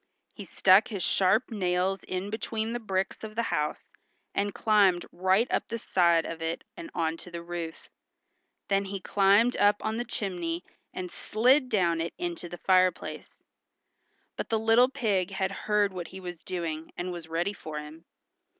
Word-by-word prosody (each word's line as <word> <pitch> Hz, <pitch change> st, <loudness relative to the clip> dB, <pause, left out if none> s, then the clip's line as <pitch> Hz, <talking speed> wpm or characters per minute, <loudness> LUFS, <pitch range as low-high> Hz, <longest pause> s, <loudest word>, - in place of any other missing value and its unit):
He -, -, -9 dB
stuck 190 Hz, +3 st, +5 dB
his 200 Hz, -5 st, -4 dB
sharp 200 Hz, +6 st, +2 dB
nails 185 Hz, -1 st, 0 dB
in 185 Hz, +2 st, -4 dB
between 220 Hz, +1 st, -3 dB
the 240 Hz, -, -2 dB
bricks 195 Hz, -3 st, -2 dB
of 215 Hz, 0 st, -7 dB
the 235 Hz, -, +1 dB
house 150 Hz, 0 st, -1 dB, 0.5 s
and 205 Hz, +1 st, 0 dB
climbed 200 Hz, -5 st, +3 dB
right 190 Hz, +5 st, +2 dB
up -, -, 0 dB
the 230 Hz, -, -3 dB
side 170 Hz, -6 st, +3 dB
of 165 Hz, 0 st, -6 dB
it 165 Hz, +1 st, -3 dB
and 335 Hz, -2 st, -8 dB
onto 165 Hz, +1 st, -2 dB
the 170 Hz, -1 st, -7 dB
roof. 170 Hz, -1 st, -6 dB, 0.8 s
Then 195 Hz, 0 st, +1 dB
he 195 Hz, 0 st, -4 dB
climbed 200 Hz, +6 st, +4 dB
up 205 Hz, 0 st, +5 dB
on 220 Hz, +1 st, -1 dB
the 240 Hz, -, -1 dB
chimney 180 Hz, -7 st, -3 dB, 0.3 s
and 180 Hz, -1 st, -6 dB
slid 255 Hz, +5 st, +2 dB
down 170 Hz, -6 st, +2 dB
it 165 Hz, -, -4 dB
into 345 Hz, -, -4 dB
the 175 Hz, -, -7 dB
fire 185 Hz, +1 st, +4 dB
place. -, -, -9 dB, 1.0 s
But -, -, -4 dB
the 225 Hz, -, +2 dB
little 225 Hz, +3 st, +5 dB
pig 200 Hz, -8 st, 0 dB
had 190 Hz, -1 st, -1 dB
heard 205 Hz, 0 st, +1 dB
what 175 Hz, -2 st, -5 dB
he 190 Hz, -, -9 dB
was 175 Hz, -3 st, -7 dB
doing, 165 Hz, -3 st, -4 dB
and 180 Hz, +1 st, -3 dB
was 170 Hz, -2 st, -7 dB
ready 170 Hz, +5 st, -1 dB
for 155 Hz, -6 st, -7 dB
him. 150 Hz, +2 st, -9 dB
190 Hz, 175 wpm, -28 LUFS, 175-215 Hz, 1.0 s, stuck